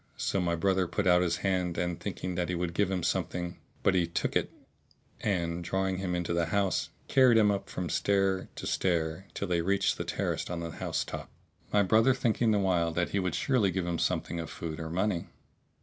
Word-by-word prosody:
So 95 Hz, -, 0 dB
my 85 Hz, -1 st, +1 dB
brother 95 Hz, +1 st, +1 dB
put 100 Hz, +3 st, -1 dB
out 90 Hz, -1 st, +5 dB
his 85 Hz, -1 st, +1 dB
hand 90 Hz, -3 st, +1 dB, 0.2 s
thinking 90 Hz, -, -4 dB
that 90 Hz, 0 st, -1 dB
he 90 Hz, -, 0 dB
would 85 Hz, 0 st, -2 dB
give 100 Hz, +2 st, +1 dB
him 95 Hz, -3 st, -1 dB
something; 90 Hz, +1 st, -2 dB, 0.2 s
but 100 Hz, -, +4 dB
he 90 Hz, -2 st, +2 dB
took 85 Hz, -, -2 dB
it -, -, +1 dB, 0.7 s
and, 85 Hz, -3 st, -1 dB
drawing 95 Hz, +2 st, 0 dB
him 90 Hz, -2 st, -2 dB
into 85 Hz, -1 st, -1 dB
the 85 Hz, -1 st, +1 dB
house, 100 Hz, -1 st, 0 dB, 0.2 s
carried 130 Hz, -4 st, +5 dB
him 105 Hz, -2 st, +5 dB
up 100 Hz, -1 st, -3 dB
from 90 Hz, -, -3 dB
stair 95 Hz, +3 st, +1 dB
to -, -, -6 dB
stair 85 Hz, 0 st, 0 dB
till 100 Hz, -, -2 dB
they 85 Hz, -1 st, +1 dB
reached 100 Hz, +3 st, +1 dB
the -, -, 0 dB
terrace -, -, -2 dB
on 90 Hz, -1 st, -3 dB
the 85 Hz, -1 st, -4 dB
house -, -, -2 dB
top, -, -, -6 dB, 0.4 s
my 105 Hz, -1 st, +4 dB
brother 115 Hz, +6 st, +4 dB
thinking 120 Hz, -2 st, +1 dB
the 105 Hz, -, +3 dB
while 90 Hz, -4 st, +2 dB
that 85 Hz, +1 st, 0 dB
he 100 Hz, -, 0 dB
would 90 Hz, -2 st, -1 dB
surely 125 Hz, -8 st, +2 dB
give 95 Hz, -1 st, -1 dB
him 85 Hz, -2 st, -2 dB
something 85 Hz, -, -1 dB
of 80 Hz, -, -5 dB
food 80 Hz, -1 st, -5 dB
or 80 Hz, -1 st, -4 dB
money. 90 Hz, +1 st, 0 dB
90 Hz, 210 wpm, -30 LUFS, 85-100 Hz, 0.7 s, out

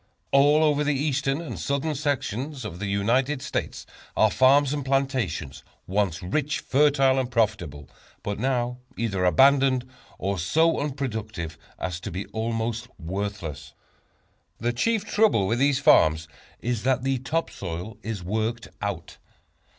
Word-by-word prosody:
All 145 Hz, +3 st, +5 dB
over 150 Hz, -1 st, +3 dB
the 150 Hz, 0 st, +1 dB
Eastern 140 Hz, +1 st, 0 dB
and 170 Hz, -, -6 dB
Southern 140 Hz, +3 st, -1 dB
sections 140 Hz, -2 st, -2 dB
of 90 Hz, -4 st, -6 dB
the 105 Hz, -, -3 dB
United 120 Hz, +8 st, +1 dB
States -, -, -3 dB, 0.3 s
are 110 Hz, -1 st, +5 dB
farms 135 Hz, +2 st, +4 dB
and 145 Hz, -1 st, -2 dB
plantations, 125 Hz, -, -1 dB, 0.2 s
once 95 Hz, -2 st, -1 dB
rich, 145 Hz, +10 st, -1 dB
fertile 135 Hz, -1 st, +3 dB
and 130 Hz, -2 st, -1 dB
profitable, 100 Hz, -, -1 dB, 0.4 s
but 105 Hz, 0 st, -3 dB
now 125 Hz, 0 st, 0 dB, 0.2 s
either 100 Hz, -5 st, -1 dB
abandoned, 130 Hz, +5 st, +4 dB, 0.3 s
or 100 Hz, 0 st, -2 dB
so 160 Hz, -, +2 dB
unproductive 110 Hz, -, -4 dB, 0.2 s
as 90 Hz, -2 st, -3 dB
to -, -, -6 dB
be 95 Hz, +4 st, -4 dB
almost 115 Hz, +1 st, -2 dB
worthless. 95 Hz, -3 st, -5 dB, 0.8 s
The 120 Hz, +2 st, -1 dB
chief 220 Hz, -, +1 dB
trouble 210 Hz, -, +3 dB
with 115 Hz, +5 st, 0 dB
these 140 Hz, 0 st, +3 dB
farms 80 Hz, -7 st, +4 dB, 0.3 s
is 120 Hz, -2 st, -1 dB
that 130 Hz, +1 st, +1 dB
the 135 Hz, -1 st, 0 dB
top 155 Hz, +6 st, -2 dB
soil 90 Hz, +4 st, -6 dB
is 110 Hz, -5 st, -5 dB
worked 110 Hz, +5 st, -2 dB
out. 100 Hz, -5 st, -4 dB
120 Hz, 140 wpm, -25 LUFS, 100-140 Hz, 0.8 s, All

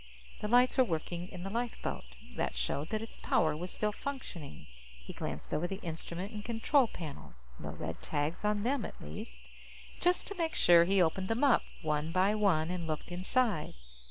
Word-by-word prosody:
The 210 Hz, -, -2 dB
lights 245 Hz, +3 st, +5 dB
were -, -, +9 dB
working 175 Hz, -2 st, -3 dB
in 180 Hz, -2 st, -7 dB
the 195 Hz, -, -4 dB
lifeboat. 235 Hz, -, -2 dB, 0.3 s
That -, -, -1 dB
showed 65 Hz, -, -1 dB
that 215 Hz, 0 st, -1 dB
its 225 Hz, -, -10 dB
power 155 Hz, -1 st, +2 dB
was 175 Hz, +4 st, -4 dB
still 210 Hz, +2 st, 0 dB
functioning. 205 Hz, -, -6 dB, 0.3 s
He 65 Hz, 0 st, -10 dB
glanced -, -, -5 dB
over 170 Hz, +3 st, +1 dB
the 195 Hz, +1 st, -4 dB
instrument 170 Hz, +3 st, -4 dB
and 210 Hz, -1 st, -5 dB
control 235 Hz, +4 st, +3 dB
panels. 140 Hz, -, -9 dB
No -, -, -5 dB
red 80 Hz, 0 st, -5 dB
tags 150 Hz, +4 st, -1 dB
on 210 Hz, -1 st, +1 dB
them, 260 Hz, 0 st, +1 dB
at -, -, -7 dB
least. -, -, -8 dB, 0.6 s
Just 355 Hz, +1 st, +3 dB
to 405 Hz, -, -5 dB
make 325 Hz, -1 st, 0 dB
sure, 170 Hz, -1 st, +7 dB
he 190 Hz, 0 st, +4 dB
opened 185 Hz, +3 st, 0 dB
them 225 Hz, +6 st, 0 dB
up, 275 Hz, -4 st, +6 dB, 0.2 s
one 155 Hz, +1 st, 0 dB
by 185 Hz, +4 st, +4 dB
one, 180 Hz, -6 st, +2 dB
and 175 Hz, -2 st, -3 dB
looked 155 Hz, +1 st, -3 dB
inside. 185 Hz, -, 0 dB
180 Hz, 185 wpm, -33 LUFS, 155-225 Hz, 0.6 s, were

